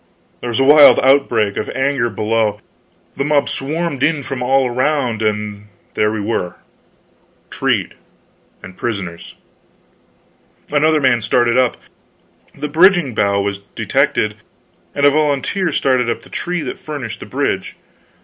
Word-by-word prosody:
There -, -, -6 dB
was 120 Hz, -, -1 dB
a -, -, +4 dB
wild 145 Hz, +1 st, +7 dB
outbreak 130 Hz, -6 st, +2 dB
of -, -, -3 dB
anger 130 Hz, -3 st, 0 dB
below, 110 Hz, -1 st, 0 dB
and 105 Hz, -, -22 dB, 0.6 s
the -, -, 0 dB
mob 145 Hz, 0 st, +1 dB
swarmed 150 Hz, 0 st, -3 dB
in 150 Hz, -1 st, +1 dB
from 125 Hz, 0 st, -5 dB
all 130 Hz, +1 st, +2 dB
around, 125 Hz, -2 st, -1 dB
and 105 Hz, -1 st, -3 dB, 0.3 s
there 105 Hz, 0 st, +1 dB
we 110 Hz, -, -3 dB
were 100 Hz, -4 st, -3 dB, 1.0 s
treed, -, -, -1 dB, 0.7 s
and 95 Hz, -, -11 dB
prisoners. 95 Hz, -8 st, -5 dB, 1.4 s
Another 155 Hz, +1 st, +3 dB
man 130 Hz, -4 st, +2 dB
started 120 Hz, +2 st, +1 dB
up; 130 Hz, -1 st, +2 dB, 0.8 s
the 150 Hz, +2 st, -4 dB
bridging 170 Hz, -3 st, +4 dB
bough 100 Hz, -1 st, +1 dB
was 100 Hz, 0 st, -3 dB
detected, 105 Hz, +1 st, -1 dB, 0.6 s
and 145 Hz, -, +2 dB
a 145 Hz, -, +6 dB
volunteer 155 Hz, +5 st, 0 dB
started 130 Hz, -4 st, +1 dB
up 115 Hz, -, -3 dB
the -, -, -16 dB
tree 175 Hz, -2 st, -3 dB
that 130 Hz, -, -6 dB
furnished 145 Hz, -7 st, -6 dB
the -, -, -9 dB
bridge. -, -, -2 dB
130 Hz, 140 wpm, -17 LUFS, 110-145 Hz, 1.4 s, wild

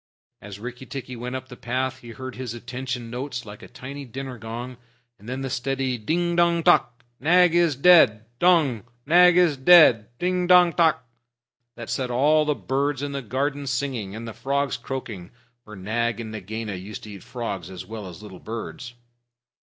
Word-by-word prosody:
As 100 Hz, 0 st, -9 dB
Rikki 125 Hz, +3 st, -8 dB
tikki 130 Hz, -2 st, -7 dB
went 125 Hz, +2 st, -5 dB
up 130 Hz, 0 st, -6 dB
the 125 Hz, -, -11 dB
path, 130 Hz, +2 st, -3 dB
he 120 Hz, -, -12 dB
heard 130 Hz, +3 st, -7 dB
his 125 Hz, -2 st, -5 dB
"attention" 125 Hz, 0 st, -5 dB
notes 125 Hz, -1 st, -5 dB
like 105 Hz, -1 st, -11 dB
a -, -, -11 dB
tiny 135 Hz, +3 st, -8 dB
dinner 130 Hz, 0 st, -7 dB
gong, 120 Hz, +3 st, -7 dB, 0.4 s
and 105 Hz, +4 st, -11 dB
then 130 Hz, +1 st, -4 dB
the 135 Hz, -, -3 dB
steady 130 Hz, -1 st, -2 dB
"Ding 170 Hz, +9 st, 0 dB
dong 170 Hz, -1 st, +3 dB
tock! 125 Hz, -8 st, +3 dB, 0.2 s
Nag 175 Hz, +4 st, +4 dB
is 170 Hz, -4 st, +3 dB
dead 135 Hz, -8 st, +6 dB
dong! 155 Hz, -, +3 dB, 0.2 s
Nagaina 180 Hz, +3 st, +6 dB
is 165 Hz, -6 st, +3 dB
dead! 130 Hz, -7 st, +6 dB
Ding 180 Hz, +2 st, 0 dB
dong 180 Hz, -1 st, +6 dB
tock!" 160 Hz, -6 st, +2 dB, 0.7 s
That 115 Hz, -1 st, -7 dB
set 125 Hz, +1 st, -2 dB
all 150 Hz, +5 st, +3 dB
the 150 Hz, -1 st, +1 dB
birds 140 Hz, +1 st, -1 dB
in 145 Hz, -, -3 dB
the 140 Hz, 0 st, -3 dB
garden 140 Hz, +4 st, -2 dB
singing, 125 Hz, -6 st, -3 dB
and 115 Hz, +1 st, -7 dB
the 110 Hz, -, -6 dB
frogs 140 Hz, +3 st, -1 dB
croaking, 110 Hz, -9 st, -6 dB, 0.3 s
for 105 Hz, -1 st, -11 dB
Nag 115 Hz, +4 st, -2 dB
and 110 Hz, -2 st, -6 dB
Nagaina 110 Hz, +1 st, -5 dB
used 95 Hz, +2 st, -8 dB
to 105 Hz, -, -9 dB
eat 100 Hz, -, -10 dB
frogs 115 Hz, -8 st, -5 dB
as 95 Hz, -1 st, -8 dB
well 110 Hz, -3 st, -7 dB
as 90 Hz, +2 st, -11 dB
little 95 Hz, -4 st, -11 dB
birds. 120 Hz, +2 st, -7 dB
125 Hz, 185 wpm, -24 LUFS, 115-145 Hz, 0.7 s, dead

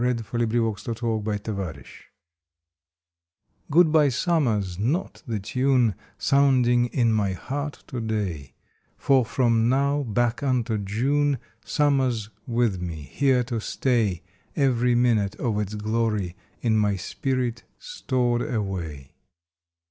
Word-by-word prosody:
August 120 Hz, -2 st, 0 dB
Thirtieth 115 Hz, -3 st, 0 dB, 0.2 s
SUMMER 115 Hz, -2 st, -1 dB, 0.2 s
PASSES 95 Hz, -, -5 dB, 1.8 s
"/^OOD 160 Hz, +1 st, +5 dB
BY 150 Hz, -2 st, +5 dB
Summer" 135 Hz, -3 st, +1 dB
s 95 Hz, -3 st, -4 dB
not 140 Hz, -, -1 dB
the 110 Hz, -3 st, -2 dB
tune 125 Hz, +2 st, +2 dB
^^ -, -, -11 dB, 0.2 s
Sounding 125 Hz, -3 st, +3 dB
in 120 Hz, -2 st, +1 dB
my 100 Hz, -3 st, +1 dB
heart 145 Hz, -, -5 dB
to 125 Hz, -3 st, -5 dB
day, 95 Hz, -12 st, -3 dB, 0.4 s
For 135 Hz, -2 st, +3 dB
from 115 Hz, -1 st, +2 dB
now 140 Hz, +2 st, +2 dB
back 120 Hz, 0 st, 0 dB
unto 125 Hz, -5 st, 0 dB
June 135 Hz, +8 st, +1 dB, 0.3 s
Summer 135 Hz, +4 st, +2 dB
s 110 Hz, -4 st, -3 dB, 0.2 s
with 115 Hz, -6 st, +1 dB
me, 80 Hz, -4 st, -5 dB
here 135 Hz, -3 st, +3 dB
to 120 Hz, -2 st, -3 dB
stay, 110 Hz, -9 st, 0 dB, 0.3 s
Every 125 Hz, -4 st, +2 dB
minute 115 Hz, -5 st, +2 dB
of 110 Hz, -4 st, -1 dB
its 105 Hz, 0 st, -3 dB
glory 105 Hz, -4 st, -1 dB, 0.3 s
in 110 Hz, -2 st, +3 dB
my 105 Hz, -1 st, +2 dB
spirit 125 Hz, +5 st, -2 dB, 0.2 s
stored 130 Hz, -, -1 dB
away. 90 Hz, -, -4 dB
120 Hz, 125 wpm, -25 LUFS, 105-130 Hz, 1.8 s, ^OOD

